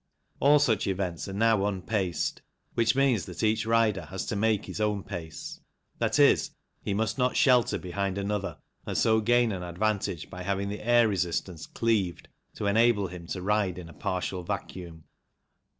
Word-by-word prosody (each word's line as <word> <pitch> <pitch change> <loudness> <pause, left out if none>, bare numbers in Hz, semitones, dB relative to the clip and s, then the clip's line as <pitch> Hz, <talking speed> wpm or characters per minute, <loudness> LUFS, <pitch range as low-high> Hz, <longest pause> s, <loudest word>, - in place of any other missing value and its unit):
All 145 +2 +6
such 115 -8 +2
events 95 -3 -2
are 95 - -6
now 110 0 +3
unpaced, 95 -2 -2 0.3
which 115 +1 +2
means 135 -7 +2
that 90 - -6
each 110 0 +1
rider 115 -4 +2
has 95 -1 -5
to - - -3
make 110 0 +1
his - - -5
own 105 -2 0
pace, 80 -4 -7 0.4
i.e. - - +5 0.5
he - - -3
must 110 +3 -1
not 125 0 +1
shelter 125 -4 +4
behind 95 +1 -3
another 100 -4 -2 0.3
and - - -2
so 110 -1 +3
gain 120 +1 +3
an 95 -3 -4
advantage 90 -2 -2
by 90 - -9
having 100 +1 -1
the 105 - -5
air 120 +1 +4
resistance 90 -4 -2
cleaved 105 -7 -1 0.3
to - - -4
enable 105 -1 +3
him 85 -1 -9
to 90 +1 -4
ride 100 -3 +1
in 85 -2 -8
a - - -12
partial 90 +2 -3
vacuum. 85 -2 -6
100 Hz, 165 wpm, -28 LUFS, 90-110 Hz, 0.5 s, All